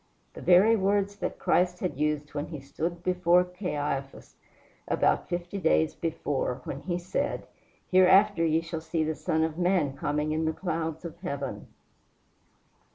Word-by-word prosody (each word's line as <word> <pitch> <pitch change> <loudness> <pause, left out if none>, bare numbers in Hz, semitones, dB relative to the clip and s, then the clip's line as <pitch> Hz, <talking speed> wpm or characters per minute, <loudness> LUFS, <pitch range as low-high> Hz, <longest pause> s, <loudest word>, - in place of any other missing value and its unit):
the - - -10
very 195 +6 +6
words 200 0 +1
that - - -3
Christ 180 0 +1
had 180 -7 -2
used 150 -1 -1
when 145 +1 -3
he 155 -3 -7
stood 165 +5 -4
before 180 -1 +3
Caiaphas 150 -7 -4 0.5
about - - +1
fifty 175 +2 -3
days 160 -2 +2
before, 145 -5 -2
when 140 +2 -6
he 175 0 -2
said, 180 +1 -2 0.5
"Hereafter 185 0 +5
ye 160 0 +2
shall 165 -1 -5
see 160 0 -1
the 155 0 -1
Son 160 +2 0
of 160 +1 -2
man 175 -6 +1
coming 150 +2 -1
in 160 +1 0
the 160 - 0
clouds 165 -2 -3
of 170 0 -8
heaven!" 140 -6 -5
165 Hz, 155 wpm, -28 LUFS, 150-180 Hz, 0.5 s, very